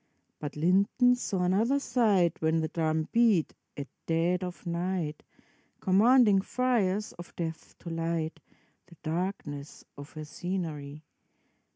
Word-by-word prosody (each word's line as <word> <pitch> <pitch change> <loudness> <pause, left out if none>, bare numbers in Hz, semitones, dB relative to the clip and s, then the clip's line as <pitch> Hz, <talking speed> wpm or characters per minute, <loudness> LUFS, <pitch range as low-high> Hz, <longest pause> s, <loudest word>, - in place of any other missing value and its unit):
But 150 - -5
Linden 195 +10 +3
saw 200 -7 -1
another 215 +9 +2
sight 210 - +2
When 160 0 +2
the 160 - -1
drum 160 -1 0
beat, 230 -8 +3 0.2
at 140 0 -5 0.2
dead 170 +3 +1
of 180 0 -7
night, 170 -2 -2 0.6
Commanding 210 +1 +5
fires 215 -4 0
of 175 - -10
death 165 -2 -6
to 170 - -8
light 165 -1 -2 0.5
The 175 - -16
darkness 155 -4 -4
of 145 +1 -10
her 155 -1 -7
scenery. 155 -4 -5
175 Hz, 125 wpm, -29 LUFS, 160-200 Hz, 0.6 s, Commanding